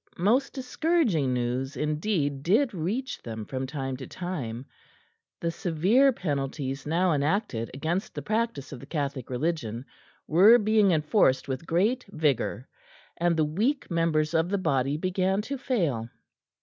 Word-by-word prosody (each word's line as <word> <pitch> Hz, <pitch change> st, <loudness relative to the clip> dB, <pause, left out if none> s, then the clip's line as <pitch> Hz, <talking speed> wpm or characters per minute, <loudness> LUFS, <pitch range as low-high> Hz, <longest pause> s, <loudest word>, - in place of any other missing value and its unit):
Most 235 Hz, +10 st, +2 dB
discouraging 260 Hz, -, +1 dB
news 125 Hz, +2 st, -2 dB
indeed 150 Hz, -, -1 dB
did 220 Hz, -, +2 dB
reach 200 Hz, +10 st, -3 dB
them 110 Hz, -2 st, -6 dB
from 130 Hz, +2 st, -4 dB
time 135 Hz, -2 st, -4 dB
to 130 Hz, -, -8 dB
time. 135 Hz, -10 st, -5 dB, 0.8 s
The 170 Hz, -, 0 dB
severe 190 Hz, -, +3 dB
penalties 140 Hz, -, -3 dB
now 170 Hz, +2 st, +2 dB
enacted 145 Hz, -, 0 dB
against 165 Hz, +7 st, -2 dB
the -, -, -5 dB
practice 220 Hz, -, -2 dB
of 135 Hz, -, -7 dB
the 135 Hz, -, -12 dB
Catholic 140 Hz, -5 st, -3 dB
Religion 125 Hz, -4 st, -2 dB, 0.4 s
were 195 Hz, +9 st, +7 dB
being 215 Hz, -2 st, +3 dB
enforced 150 Hz, -, +2 dB
with 135 Hz, +4 st, -4 dB
great 215 Hz, +10 st, +1 dB
vigour, 145 Hz, -, 0 dB, 0.5 s
and 170 Hz, -1 st, +1 dB
the 155 Hz, -, +3 dB
weak 215 Hz, -, -1 dB
members 165 Hz, -2 st, +1 dB
of 165 Hz, +1 st, +2 dB
the 200 Hz, -, +1 dB
body 140 Hz, -5 st, 0 dB
began 185 Hz, +3 st, 0 dB
to 275 Hz, +5 st, -4 dB
fail. 165 Hz, -, -1 dB
160 Hz, 140 wpm, -27 LUFS, 135-200 Hz, 0.8 s, were